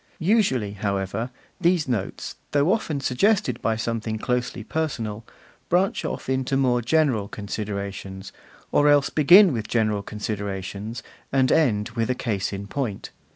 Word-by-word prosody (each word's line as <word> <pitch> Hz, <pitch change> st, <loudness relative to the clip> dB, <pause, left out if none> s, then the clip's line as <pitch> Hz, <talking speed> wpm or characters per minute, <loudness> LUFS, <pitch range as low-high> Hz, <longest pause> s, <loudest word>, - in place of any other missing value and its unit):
Usually, 165 Hz, -, +2 dB
however, 100 Hz, +3 st, -2 dB, 0.3 s
these 175 Hz, -3 st, +2 dB
notes, 115 Hz, -7 st, -3 dB, 0.2 s
though 145 Hz, +6 st, +4 dB
often 155 Hz, -10 st, -2 dB
suggested 130 Hz, -, +1 dB
by 115 Hz, -, +1 dB
something 110 Hz, 0 st, -2 dB
closely 125 Hz, 0 st, -2 dB
personal, 115 Hz, -7 st, -3 dB, 0.5 s
branch 185 Hz, +3 st, +2 dB
off -, -, -4 dB
into 130 Hz, 0 st, 0 dB
more 125 Hz, -3 st, +2 dB
general 130 Hz, -5 st, +2 dB
considerations; 100 Hz, -2 st, -5 dB, 0.4 s
or 145 Hz, 0 st, +4 dB
else 145 Hz, -1 st, +4 dB
begin 175 Hz, +4 st, +7 dB
with 110 Hz, -3 st, -3 dB
general 110 Hz, -3 st, +1 dB
considerations, 105 Hz, +1 st, -5 dB, 0.3 s
and 130 Hz, -1 st, +3 dB
end 110 Hz, -10 st, +2 dB
with 115 Hz, -1 st, -2 dB
a 125 Hz, -, +1 dB
case 105 Hz, -6 st, -2 dB
in 100 Hz, 0 st, -5 dB
point. 110 Hz, -2 st, -4 dB
115 Hz, 135 wpm, -24 LUFS, 105-140 Hz, 0.5 s, begin